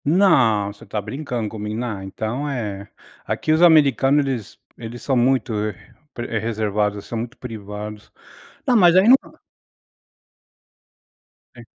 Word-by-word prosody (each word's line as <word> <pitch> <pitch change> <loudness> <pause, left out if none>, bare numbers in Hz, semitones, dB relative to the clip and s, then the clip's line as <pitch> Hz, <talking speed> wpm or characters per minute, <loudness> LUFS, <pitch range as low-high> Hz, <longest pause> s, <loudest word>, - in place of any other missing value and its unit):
Não, 125 - +3
você 100 - -17
está 105 - -4
brincando 120 +1 -4
comigo, 105 +1 -5
na 110 -6 -4
então 110 +9 -4
é, 105 -7 -5 0.3
aqui 155 - -2
os 160 +2 +3
americanos 145 -4 +5
eles 125 -7 -5 0.2
eles 120 +1 -9
são 135 - 0
muito, 125 -1 +2
eh, 105 0 -2 0.4
pre 120 -2 -4
reservados, 105 -2 -1
são 115 - -4
muito 120 +3 -6
privados. 105 -2 -8 0.5
Tá, 250 - +3
mas 175 -5 +6
aí 190 +3 +5
não 260 +3 +9 2.4
Sim. - - -12
115 Hz, 135 wpm, -21 LUFS, 105-140 Hz, 2.4 s, não